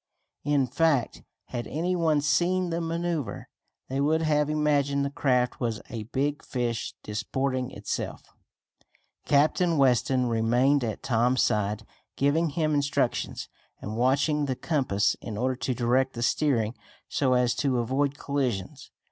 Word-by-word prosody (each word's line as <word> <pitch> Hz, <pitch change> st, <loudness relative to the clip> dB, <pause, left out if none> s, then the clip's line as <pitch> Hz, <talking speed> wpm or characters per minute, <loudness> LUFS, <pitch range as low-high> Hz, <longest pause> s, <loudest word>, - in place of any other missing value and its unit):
In 145 Hz, -2 st, +2 dB
fact, 140 Hz, 0 st, +1 dB, 0.3 s
had 120 Hz, -1 st, -4 dB
any 175 Hz, +4 st, -1 dB
one 160 Hz, -4 st, +2 dB
seen 175 Hz, +4 st, +1 dB
the 170 Hz, +1 st, -1 dB
maneuver 165 Hz, -4 st, -3 dB, 0.4 s
they 135 Hz, +1 st, -2 dB
would 160 Hz, +3 st, +2 dB
have 150 Hz, -1 st, +2 dB
imagined 145 Hz, -2 st, +1 dB
the 140 Hz, -, -3 dB
craft 125 Hz, -3 st, +1 dB
was 115 Hz, -3 st, -1 dB
a 110 Hz, -3 st, -5 dB
big 140 Hz, +5 st, -2 dB
fish 120 Hz, -3 st, -3 dB
disporting 130 Hz, +5 st, -2 dB
itself. -, -, -5 dB, 1.0 s
Captain 155 Hz, +3 st, +3 dB
Weston 130 Hz, -1 st, +3 dB
remained 120 Hz, +4 st, +2 dB
at 110 Hz, -3 st, -4 dB
Tom's 125 Hz, +1 st, +2 dB
side, 105 Hz, 0 st, 0 dB, 0.3 s
giving 155 Hz, +4 st, +2 dB
him 155 Hz, +1 st, 0 dB
instructions, 145 Hz, -1 st, -1 dB, 0.3 s
and 105 Hz, -, -6 dB
watching 140 Hz, +5 st, +2 dB
the 130 Hz, -2 st, -2 dB
compass 125 Hz, -, +1 dB
in 110 Hz, -3 st, -6 dB
order 130 Hz, +3 st, 0 dB
to 130 Hz, 0 st, -2 dB
direct 130 Hz, +2 st, +1 dB
the 120 Hz, -, -3 dB
steering 115 Hz, -5 st, +1 dB, 0.3 s
so 130 Hz, -3 st, +1 dB
as 125 Hz, -1 st, +3 dB
to 135 Hz, -3 st, 0 dB
avoid 135 Hz, +4 st, 0 dB
collisions. 130 Hz, -11 st, -3 dB
135 Hz, 140 wpm, -27 LUFS, 120-150 Hz, 1.0 s, Captain